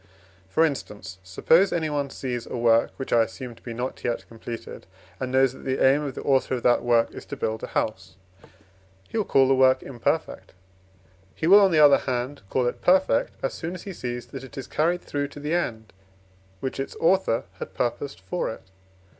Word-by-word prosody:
For 160 +11 +3
instance, 105 -10 -5
suppose 160 - +3
anyone 150 -4 -1
sees 125 -3 -5
a - - -5
work 115 -1 +3
(which 135 - -4
I 120 - +6
assume 120 +2 -4
to - - -20
be 120 - -7
not 120 +3 -5
yet 120 - -2
completed), 115 -2 -8 0.3
and 130 - -3
knows 130 -1 +3
that - - -13
the 130 0 -1
aim 135 +3 +4
of 140 -3 -4
the - - -6
author 135 -1 +2
of 120 - -5
that 120 - +4
work 120 -1 +2
is - - -9
to - - -6
build 110 0 -2
a - - -5
house, 95 -3 -3 0.9
he 225 - -3
will 210 - 0
call 135 -1 +4
the 135 - +4
work 130 0 +4
imperfect; 120 -4 -3 0.8
he - - -3
will, 195 +5 +8
on 195 -2 +5
the 160 - +2
other 145 -2 +7
hand, 130 +2 -3
call 130 - +1
it 120 - -2
perfect, 185 -9 +3
as 135 - -1
soon 170 +3 -5
as 180 - -9
he 195 - -7
sees 120 -5 -5
that 130 +2 -9
it 130 -1 -12
is 135 - -5
carried 170 +6 0
through 145 0 -2
to 145 - -11
the 150 +3 -3
end, 110 -11 -2 0.7
which 130 0 -4
its 135 - -4
author 175 -9 +2 0.2
had 95 - -7
purposed 130 +6 -3
for 180 - -3
it. - - -10
130 Hz, 205 wpm, -25 LUFS, 120-150 Hz, 0.9 s, will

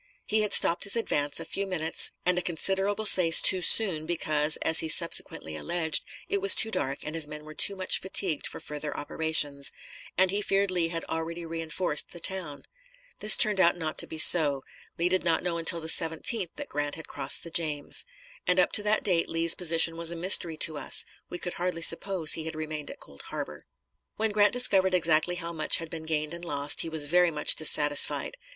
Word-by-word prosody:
He 215 0 0
had 210 - -2
stopped 170 - +2
his 200 - +1
advance 145 -11 -2
a - - -7
few 200 0 -4
minutes 160 -4 -1
and 180 0 +1
a 180 - -1
considerable 195 +5 -2
space 170 -5 +5
too 185 - +4
soon, 175 -6 +4
because, 155 -2 0
as 160 - +3
he 160 - -1
subsequently 155 - -1
alleged, 165 - 0 0.2
it 400 +1 -2
was 400 - +7
too 220 - +4
dark 135 -9 -3
and 150 - -7
his 160 -2 +1
men 150 0 -10
were 155 - -12
too 200 +6 +1
much 185 -1 +2
fatigued 185 -4 -1
for - - -9
further 150 0 -7
operations; 145 -2 -2 0.5
and 185 0 +2
he 205 +1 -2
feared 195 -1 -1
Lee 175 -2 -1
had 165 0 -6
already 165 +1 -6
re 165 0 -6
enforced 160 -1 -3
the 175 - -10
town. 170 -6 -4 0.6
This 215 - +5
turned 210 -3 +1
out 175 -1 +2
not 160 -2 -6
to - - 0
be 160 - -9
so; 150 -4 +5 0.3
Lee 170 - 0
did 185 +1 -1
not 170 -2 -1
know 170 -2 -3
until 165 +1 +2
the 160 - -9
17th 165 +5 0
that 290 - -8
Grant 145 0 -5
had 160 - -11
crossed - - -3
the 170 - -9
James. 150 -4 -1 0.4
And 180 +1 +1
up 180 - +2
to - - +4
that 210 +1 -1
date 175 -4 -1
Lee's 165 0 +4
position 165 -1 +2
was 170 0 0
a 170 - -3
mystery 170 -2 +1
to 155 -3 -2
us; 135 - +2 0.2
we 175 - -6
could 175 - -6
hardly 180 -2 -3
suppose 170 -1 +3
he 160 - -3
had 160 - -7
remained 155 -1 -7
at - - -12
Cold 70 - -12
Harbor. - - -8 0.5
When 220 0 -2
Grant 205 0 +2
discovered 195 -7 +4
exactly 165 0 +1
how 170 -1 -7
much 155 -2 +2
had 165 -1 -8
been 160 -1 -9
gained 155 0 -3
and 170 0 -9
lost, 145 -3 0
he 165 - -4
was 160 -2 +1
very 175 +3 +2
much 150 -2 +2
dissatisfied. 150 - +3
165 Hz, 210 wpm, -26 LUFS, 155-185 Hz, 0.6 s, was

